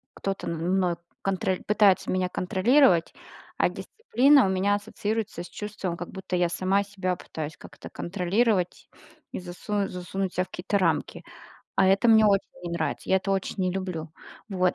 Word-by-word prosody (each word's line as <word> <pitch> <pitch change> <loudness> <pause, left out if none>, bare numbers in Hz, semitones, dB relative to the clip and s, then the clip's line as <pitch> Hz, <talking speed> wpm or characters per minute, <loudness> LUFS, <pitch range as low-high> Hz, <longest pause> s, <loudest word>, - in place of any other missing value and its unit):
кто-то 195 0 -4
мной 175 +2 0 0.3
конроль 190 -1 -1
пытается 205 -2 +4
меня 185 -1 0
контролировать. 185 - +3 0.4
А - - +3
дисциплина 280 - +3
у - - +1
меня 190 +2 +2
ассоциируется 210 -2 -3
с - - -9
чувством, 205 -4 -5
как 175 - -6
будто 190 -1 -5
я 175 -1 +2
сама 185 +3 +1
себя 190 -2 -2
пытаюсь 155 -3 -7
как-то - - -12
контролировать 185 +1 0 0.4
и - - -4
засунуть 195 +3 -3
засунуть 180 +1 -4
ся 180 - +2
в - - -11
какие-то 195 +4 -2
рамки, 175 -4 0 0.5
а 190 - +4
это 195 +4 +4
мне 220 -1 +7
очень 200 -1 +2 0.2
не 175 - -4
нравится, 170 -2 -3
я 190 - +5
это 190 +1 -2
очень 195 +1 -2
не 185 -1 +1
люблю. 180 -4 -4 0.4
Вот, 185 -3 +1
190 Hz, 165 wpm, -26 LUFS, 180-205 Hz, 0.5 s, мне